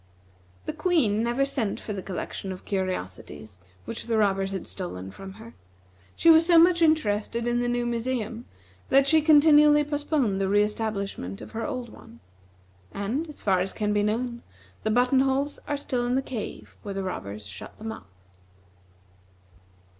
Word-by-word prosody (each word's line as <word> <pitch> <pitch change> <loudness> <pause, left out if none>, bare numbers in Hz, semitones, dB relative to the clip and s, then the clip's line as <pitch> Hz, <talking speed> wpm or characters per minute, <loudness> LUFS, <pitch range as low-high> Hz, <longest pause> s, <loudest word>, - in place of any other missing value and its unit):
The - - -3
Queen 305 - +2
never 240 +4 +1
sent 245 -7 -2
for 210 - -5
the 195 - -4
collection 190 +1 -5
of 185 - -9
curiosities 105 - -4 0.3
which 230 - -5
the 230 -1 0
robbers 195 -2 +2
had 190 -2 -4
stolen 95 - -6
from 190 - -10
her. 225 +3 -12 0.6
She 335 - +6
was 320 0 +7
so 340 0 +5
much 340 +1 +6
interested 235 -8 +1
in 240 0 +1
the 245 - 0
new 240 0 0
museum 235 -1 -3 0.4
that 275 +1 +5
she 315 +2 +4
continually 295 -1 +6
postponed 290 -8 0
the 195 - +1
re 205 +1 +4
establishment 200 - -3
of - - -10
her 230 +4 -3
old 255 -5 -4
one; 115 - -15 0.7
and, 245 +11 -3
as 300 - -11
far 190 -3 +2
as 185 +1 -2
can 210 -1 -1
be 205 - +2
known, 235 +3 -1 0.4
the - - -1
button 250 +4 +3
holes 270 +2 0
are 290 - -1
still 255 -3 -2
in 245 - +1
the 270 - +1
cave 235 -6 -7
where 200 -2 -6
the 195 - -2
robbers 105 - -5
shut 95 -1 -10
them 220 +1 -5
up. 95 - -10
230 Hz, 170 wpm, -26 LUFS, 195-275 Hz, 0.7 s, was